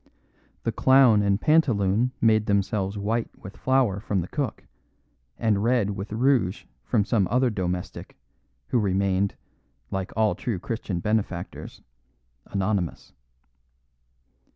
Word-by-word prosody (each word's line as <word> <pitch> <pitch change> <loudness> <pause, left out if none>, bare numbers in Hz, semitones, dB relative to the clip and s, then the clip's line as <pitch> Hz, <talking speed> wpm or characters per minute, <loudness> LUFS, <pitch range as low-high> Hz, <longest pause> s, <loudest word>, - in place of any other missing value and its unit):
The 115 - 0
clown 130 -2 +5
and 100 0 +1
pantaloon 120 -7 +2
made 110 -1 +3
themselves 100 0 0
white 110 +3 -1
with 95 - -11
flour 130 -7 +1
from 100 -3 -1
the 85 - -5
cook, 140 +3 -3 0.7
and 105 -3 +1
red 115 -4 +2
with 100 +1 -6
rouge 115 -4 +1 0.2
from 105 -5 +1
some 105 -3 +1
other 125 +1 +2
domestic, 90 -3 -4 0.5
who 125 - +2
remained 100 -1 +1 0.6
(like 95 -1 -3
all 110 -1 +3
true 115 -6 -3
Christian 95 -3 -4
benefactors) 100 -4 -3 0.6
anonymous. 100 -3 -2
105 Hz, 115 wpm, -25 LUFS, 95-115 Hz, 0.7 s, clown